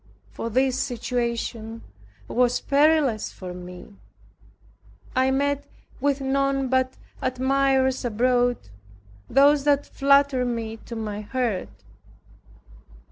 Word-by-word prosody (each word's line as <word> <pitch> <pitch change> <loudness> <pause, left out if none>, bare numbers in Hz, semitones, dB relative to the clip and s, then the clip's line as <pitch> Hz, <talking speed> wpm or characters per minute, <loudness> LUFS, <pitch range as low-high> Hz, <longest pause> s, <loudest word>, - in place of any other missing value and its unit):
For 230 - -5
this 260 +2 +1
situation 235 -2 -3 0.4
was 245 0 +2
perilous 285 -5 +2
for 180 -1 -8
me. 180 +3 -11 1.2
I 260 +1 +3
met 285 +1 0 0.3
with 280 -1 0
none 275 0 0
but 260 0 +1 0.3
admirers 265 0 +1
abroad, 245 +1 +2 0.7
those 280 +2 +5
that 290 -1 +3
flattered 275 -2 +3
me 230 -2 -3
to 235 - -6
my 210 -2 -4
hurt. 220 - -2
255 Hz, 95 wpm, -24 LUFS, 230-275 Hz, 1.2 s, those